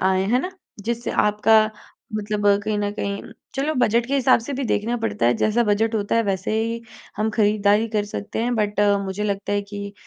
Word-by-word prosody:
आए 190 0 +2
है 250 - +4
ना। 365 - -4 0.3
जिससे 235 +1 -2 0.2
आपका 215 +1 +4 0.5
मतलब 210 0 -2 0.2
कहीं 215 -1 0
न 205 0 -1
कहीं 200 -1 -3 0.3
चलो 280 +3 0
बजट 235 0 +2
के 275 - -1
हिसाब 260 -3 +4
से 245 +5 -6
भी 275 0 -2
देखना 230 +1 0
पड़ता 225 - -1
है 120 - +4
जैसा 220 +2 +2
बजट 220 +2 +1
होता 205 -2 0
है 230 - +3
वैसे 195 0 -1
ही 230 +1 -3 0.4
हम 215 +1 0
ख़रीददारी 210 0 +2
कर 210 -2 0
सकते 205 0 -6
हैं। 245 +1 0
बट 210 -2 -1
अ, 205 -1 +4
मुझे 200 +1 -3
लगता 200 -1 -2
है 205 0 +1
कि 200 0 -7
210 Hz, 210 wpm, -22 LUFS, 205-230 Hz, 0.5 s, है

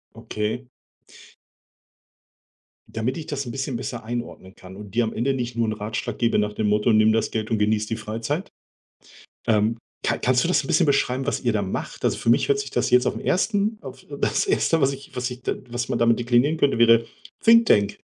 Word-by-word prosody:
Okay. 115 +2 -4 2.2
Damit 115 +4 -3
ich 160 - -7
das 140 -2 -3
'n 120 - -6
bisschen 135 0 -3
besser 120 -1 -5
einordnen 120 -5 -6
kann 95 +1 -13
und 105 0 -11
dir 120 - +3
am 110 - -3
Ende 135 +4 0
nicht 120 -2 -4
nur 115 -1 0
'n 110 - -1
Ratschlag 110 +1 -4
gebe 115 -3 +2
nach 105 0 -1
dem 105 0 -1
Motto: 105 +3 +2
„Nimm 110 0 +5
das 110 0 0
Geld 110 0 -3
und 110 - +1
genieße 105 0 +1
die 115 - -2
Freizeit,“ 115 - -4 1.0
ähm, 110 +1 +2 0.2
ka - - 0
kannst 125 0 +2
du - - 0
das 155 -5 +2
'n - - -7
bisschen 170 +4 +3
beschreiben, 135 -2 +1
was - - -1
ihr 120 -2 +1
da 105 -1 0
macht? 95 - -5
Also, - - +1
für 115 - +1
mich 120 - +3
hört 420 0 +3
sich 420 - -6
das - - 0
jetzt 125 0 +4
auf - - 0
'n - - -5
1. 205 +3 0
auf - - -10 0.2
das - - +1
1., 275 - +2
was 135 -1 +3
ich 135 0 -11
was 125 0 -2
ich 125 0 -9
d - - -2
was 120 0 -3
man - - -1
damit 115 0 +3
deklinieren 120 +6 +2
könnte, 140 -5 +2
wäre: 115 0 +5 0.4
„Thinktank.“ 225 - +4
120 Hz, 215 wpm, -23 LUFS, 110-135 Hz, 2.2 s, Nimm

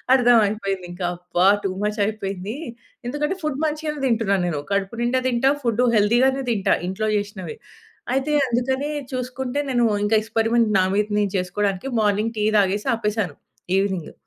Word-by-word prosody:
అర్థమైపోయింది 210 -6 +2
ఇంకా. 175 +1 -4
అబ్బా! 180 +1 +1 0.2
టూ 190 - 0
మచ్ 210 +1 -1
అయిపోయింది. 200 0 -4 0.5
ఎందుకంటే 295 +8 -2
ఫుడ్ 295 -2 -2
మంచిగానే 300 -1 -3
తింటున్నాను, 205 -6 +1
నేను 150 -4 -2
కడుపు 200 +3 -1
నిండా 250 +2 +1
తింటా, 255 +2 +3
ఫుడ్ 235 0 +1
హెల్తీగానే 255 +6 +3
తింటా, 200 -3 +2
ఇంట్లో 215 +3 -2
చేసినవే. 205 -5 -5 0.6
అయితే 270 +3 0 0.2
అందుకనే 260 +4 -1 0.2
చూసుకుంటే, 255 +2 -3
నేను 240 -1 +3 0.2
ఇంకా 220 +1 +3
ఎక్స్‌పెరిమెంట్ 225 +1 +1
నా 185 - +3
మీద 210 0 +1
చేసుకోవడానికి 195 +5 -1
మార్నింగ్ 210 +2 +1
టీ 210 - +1
తాగేసి 200 +1 +1
ఆపేసాను. 210 -7 -2 0.4
ఈవెనింగ్. 190 -4 -1
215 Hz, 140 wpm, -22 LUFS, 195-250 Hz, 0.6 s, తింటా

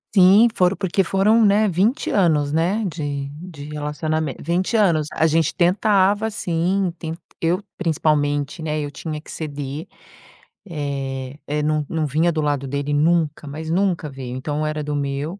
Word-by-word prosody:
Sim, 195 +4 +7
foram, 180 +1 +2
porque 190 0 +1
foram, 210 +5 +3
né, 210 +1 +4
20 200 - +1
anos, 155 -7 +2
né, 180 +8 +1
de 145 -4 -4
de 155 -2 -9
relacionamen 150 0 -2
20 180 +7 -1
anos. 165 -8 +3
A 160 - +3
gente 160 -1 +2
tentava, 200 +3 +3
sim, 185 -2 0
ten 160 -1 -5 0.3
eu 175 +4 +1 0.2
principalmente, 150 -3 0
né, 155 -1 -1
eu 145 -1 -3
tinha 150 +2 -6
que - - -16
ceder. 145 -1 -5 0.8
Eh 135 -3 -4
eh, 150 +1 -1
não 155 0 0
não 160 -2 -1
vinha 160 +5 +2
do 155 - -1
lado 145 -2 -1
dele 140 +2 -2
nunca 155 0 +1
mas 155 +3 -6
nunca 175 -3 0
veio. 130 -2 -7
Então 150 +3 -2
era 155 0 -2
do 145 0 -3
meu. 145 +6 -3
155 Hz, 160 wpm, -21 LUFS, 145-180 Hz, 0.8 s, Sim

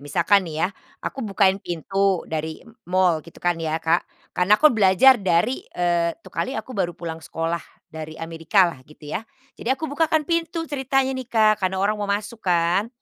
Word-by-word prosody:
misalkan 170 +7 +3
nih 160 +1 -1
ya - - +1 0.4
aku 270 - -4
bukain 195 -3 +2
pintu 195 +2 0
dari 160 +5 -5 0.2
mall 180 -3 +3
gitu 170 - -16
kan 175 -2 +1
ya 160 -1 -1
Kak, 165 +1 0 0.2
karena 190 +4 +4
aku 305 +2 +5
belajar 215 +4 +5
dari, 190 +7 +1 0.2
eee, 170 -1 +1
tuh - - -14
kali 265 - -2
aku 260 - -6
baru 185 -6 -2
pulang 165 -1 -6
sekolah 165 +4 -3 0.3
dari 155 0 -7
Amerikalah 165 0 +1
gitu 150 0 -16
ya. - - -1 0.3
Jadi - - -7
aku 270 +5 0
bukakan 315 +1 +1
pintu 335 0 -1
ceritanya 270 -2 0
nih 260 -2 -6
Kak 215 -2 +3
karena 190 0 0
orang 210 +2 0
mau 205 - -2
masuk 210 +3 -3
kan, 175 +3 +1
190 Hz, 180 wpm, -23 LUFS, 170-230 Hz, 0.4 s, aku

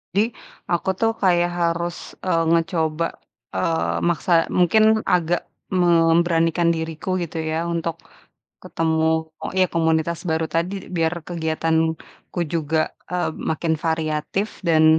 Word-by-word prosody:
Jadi, 220 +4 +3 0.4
aku 175 +2 +1
tuh 225 0 +3
kayak 175 -2 +3
harus, 170 0 0 0.3
eee, 165 -3 +2
ngecoba, 165 -1 +1 0.5
eee, 85 +1 0
maksa, 175 +1 -1 0.3
mungkin 195 +5 +5 0.3
agak 175 0 0 0.4
memberanikan 165 0 +3
diriku 160 +2 -5
gitu 165 0 -6
ya. 165 +2 -1
Untuk, 165 0 -2 0.7
ketemu 160 -1 0 0.5
iya, 185 - +5
komunitas 160 0 +1
baru 160 0 +1
tadi, 170 +4 0 0.2
biar 165 +1 +1
kegiatanku 160 0 -2 0.2
juga, 160 -1 0 0.3
eee, 180 -2 0 0.2
makin 160 0 0
variatif, 160 +5 -1 0.2
dan 160 -1 +5
165 Hz, 110 wpm, -22 LUFS, 160-175 Hz, 0.7 s, mungkin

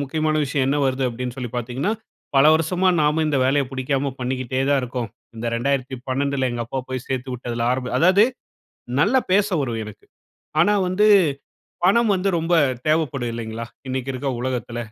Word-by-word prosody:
முக்கியமான 155 +2 0
விஷயம் 135 -1 0
என்ன 145 - +2
வருது? 130 0 -1
அப்படின்னு 125 +1 -5
சொல்லி 125 -3 -5
பார்த்தீங்கன்னா? 125 - -2 0.4
பல 135 - +6
வருஷமா 175 +4 +1
நாம 150 +2 +2
இந்த 145 -2 +1
வேலைய 135 +1 +2
புடிக்காம 135 +1 -1
பண்ணிக்கிட்டே 130 0 -2
தான் 140 -2 +3
இருக்கோம். 125 -2 -4 0.3
இந்த 115 +1 -4
2012ல 130 +1 -1
எங்க 120 0 -2
அப்பா 135 - -4
போய் 130 -1 -5
சேர்த்து 130 -1 -3
விட்டதுல 120 -1 -4
ஆரம்ப 125 0 -2
அதாவது 185 +5 +5 0.8
நல்லா 255 - +4
பேச 200 +1 +4
வரும் 120 -5 -2
எனக்கு, 105 -1 -11 0.6
ஆனா 205 +5 +4 0.2
வந்து 200 +4 +3 0.8
பணம் 225 +3 +4
வந்து 190 +1 0
ரொம்ப 165 +1 +1 0.3
தேவைப்படும் 140 -6 0
இல்லைங்களா? 115 0 -5 0.2
இன்னைக்கு 130 0 -3
இருக்கிற 135 +1 -2
உலகத்துல. 120 -2 -3
135 Hz, 155 wpm, -22 LUFS, 125-155 Hz, 0.8 s, பல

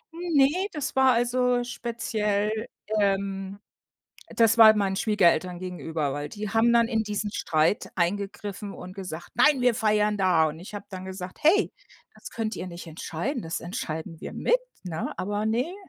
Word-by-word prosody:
Ne, 340 +2 +2
das 300 -3 -4
war 265 -1 +5
also 245 +1 +2
speziell 215 -4 -1 0.5
ähm, 195 0 -1 0.8
das 230 0 +4
war 220 -1 +9
meinen 195 -2 0
Schwiegereltern 180 -5 +2
gegenüber, 165 -5 -3
weil 145 0 -4
die 210 -1 -5
haben 225 +3 +3
dann 235 -1 +4
in 225 -2 +1
diesen 210 0 -3
Streit 160 -1 +1
eingegriffen 200 +2 -2
und 185 +1 -9
gesagt: 180 -4 -7
„Nein, 295 -4 +4
wir 245 -1 +4
feiern 210 -1 +2
da.“ 180 -5 +3
Und 160 +2 -9
ich 190 +4 -11
hab 205 0 -8
dann 185 -1 -7
gesagt: 185 -1 -7
„Hey, 385 +7 +4 0.4
das - - -11
könnt 220 -1 -3
ihr 185 - -5
nicht 170 -1 -9
entscheiden, 175 - -4
das 165 0 -4
entscheiden 165 -4 -5
wir - - -7
mit.“ - - +2 0.2
Ne? 165 -3 -4
aber 205 +2 -2
ne. 245 +11 0
205 Hz, 160 wpm, -26 LUFS, 185-235 Hz, 0.8 s, war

